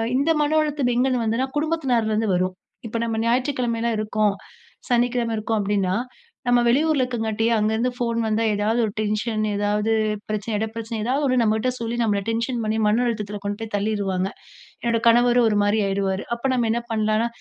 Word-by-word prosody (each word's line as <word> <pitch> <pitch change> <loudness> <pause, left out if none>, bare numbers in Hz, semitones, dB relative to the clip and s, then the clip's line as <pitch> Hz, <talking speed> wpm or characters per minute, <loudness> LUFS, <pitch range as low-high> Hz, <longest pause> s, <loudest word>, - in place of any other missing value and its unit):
இந்த 285 +5 +2
மன 310 +2 +1
அழுத்தம் 285 -5 0
எங்கேந்து 250 -1 +2
வந்ததுன்னா 230 +4 0
குடும்பத்தினார்லருந்து 245 -9 0
வரும், 185 +1 0 0.3
இப்போ 230 - -3
நம்ம 225 -1 -2
ஞாயிற்றுக்கிழமலாம் 235 -2 0
இருக்கோம், 210 -1 +1 0.5
சனிக்கிழமை 240 -1 +1
இருக்கோம் 220 0 -1
அப்படின்னா, 195 -2 0 0.5
நம்ம 245 0 +4
வெளியூர்ல 290 +3 +3
இருக்கங்காட்டி, 225 -3 -1
அங்கருந்து 220 +3 +1
ஃபோன் 235 -1 -1
வந்தா 220 +1 +1
ஏதாவது 215 +3 0
ஒரு 210 - -3
டென்ஷன் 215 +1 -1
ஏதாவது 210 +2 0 0.4
பிரச்சன, 215 +1 -2
இட 220 +1 -1
பிரச்சன, 225 0 -4
எதாவது 270 +5 0
ஒண்ணு 255 -2 +2
நம்மகிட்ட 220 +3 +1
சொல்லி 230 0 -3
நம்மள 205 -2 +1
டென்ஷன் 230 +1 -1
பண்ணி 215 +1 -1
மன 225 +4 +2
அழுத்தத்துல 210 -3 -3
கொண்டு 205 0 -3
போய் 220 -2 -6
தள்ளிருவாங்க. 200 -2 -1 0.5
என்னோட 230 -1 +1
கணவரும் 240 +1 +5
ஒரு 210 - +1
மாரி 205 +2 +2
ஆகிடுவாரு. 195 0 -1
அப்ப 235 - -15
நம்ம 240 -3 +1
என்ன 235 +1 0
பண்ணலாம்னா, 215 +1 +1
225 Hz, 165 wpm, -23 LUFS, 210-245 Hz, 0.5 s, கணவரும்